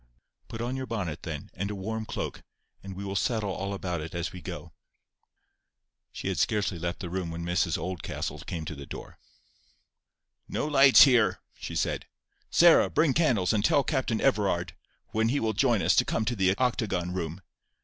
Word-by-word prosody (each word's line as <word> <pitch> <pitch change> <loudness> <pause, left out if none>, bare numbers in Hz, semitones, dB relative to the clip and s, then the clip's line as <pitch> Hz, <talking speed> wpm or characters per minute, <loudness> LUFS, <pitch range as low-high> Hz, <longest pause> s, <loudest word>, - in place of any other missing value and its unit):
"Put 115 - -6
on 120 +2 -2
your 130 -1 -4
bonnet, 95 -9 -3
then, - - -6
and 100 +2 -3
a 105 - -4
warm 110 +3 -4
cloak, - - -4 0.4
and 95 -1 -8
we 100 +2 -6
will 100 0 -4
settle 110 -1 0
all 100 +1 -4
about 90 -4 -3
it 80 +2 -7
as 85 0 -2
we 90 - -8
go." - - -8 1.4
She - - -6
had - - -1
scarcely 100 -5 0
left 85 +2 -4
the 90 - -5
room 90 -2 -2
when 85 +1 -5
Mrs 85 -1 +1
Oldcastle 90 -1 -4
came 80 -2 -5
to 80 - -5
the 70 -2 -9
door. - - -9 1.3
"No - - -2
lights 140 -3 +8
here!" 125 -6 +4 0.2
she - - -7
said. - - -1 0.4
"Sarah, 170 -1 +6
bring 155 -4 +2
candles, 120 - +2
and 105 -2 +1
tell 140 - +4
Captain 130 -7 -1
Everard, 100 -9 +1 0.4
when 110 +1 +1
he 140 +4 +1
will 110 -1 0
join - - +2
us, - - +4
to - - +6
come 110 - -1
to 120 +2 -1
the 95 -1 +2
octagon 105 -8 0
room. 85 -1 -4
100 Hz, 185 wpm, -28 LUFS, 90-115 Hz, 1.4 s, lights